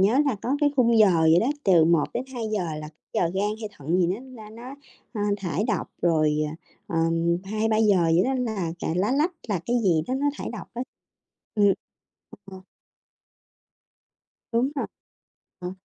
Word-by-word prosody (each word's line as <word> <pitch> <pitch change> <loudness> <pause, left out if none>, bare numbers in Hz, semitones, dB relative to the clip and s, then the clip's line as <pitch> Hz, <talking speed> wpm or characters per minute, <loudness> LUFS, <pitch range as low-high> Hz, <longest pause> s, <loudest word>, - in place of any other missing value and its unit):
nhớ 210 +7 +4
là 265 -6 +1
có 270 +4 0
cái 290 -1 +4
khung 235 -3 +4
giờ 180 -7 +5
gì 160 +2 +6
đó 235 - +1 0.2
từ 175 -5 +6
1:00-2:00 215 - 0
là 150 0 -6
c 155 - -18 0.2
giờ - - +2
gan 200 +2 +1
hay 215 - -4
thận 165 +1 -1
gì 175 - +3
nó 235 +5 -5
ra 210 - -12
nó, 240 +4 -9 0.4
ơ, 210 - -3 0.2
thải 190 +1 -2
độc, 210 - -1
rồi, 155 -3 +3
à, 155 - -7 0.3
ờm, 165 +1 +1
2:00-3:00 215 -3 +2
gì 170 - +4
đó 265 +2 0
là 220 -10 -2
cà - - -3
lá 200 +7 +1
lách, 305 +6 +2 0.2
là 195 -5 0
cái 240 +1 +1
gì 165 -4 +3
đó 255 - 0
nó 280 +2 0
thải - - -4
độc 220 - -8
á, 240 - -2 0.7
ừm, 205 -2 +5 0.7
ờ. 190 -1 -10 1.9
Đúng 235 +4 +2
rồi, 275 - -2 0.7
ờ, 180 0 -5
205 Hz, 175 wpm, -25 LUFS, 170-235 Hz, 1.9 s, gì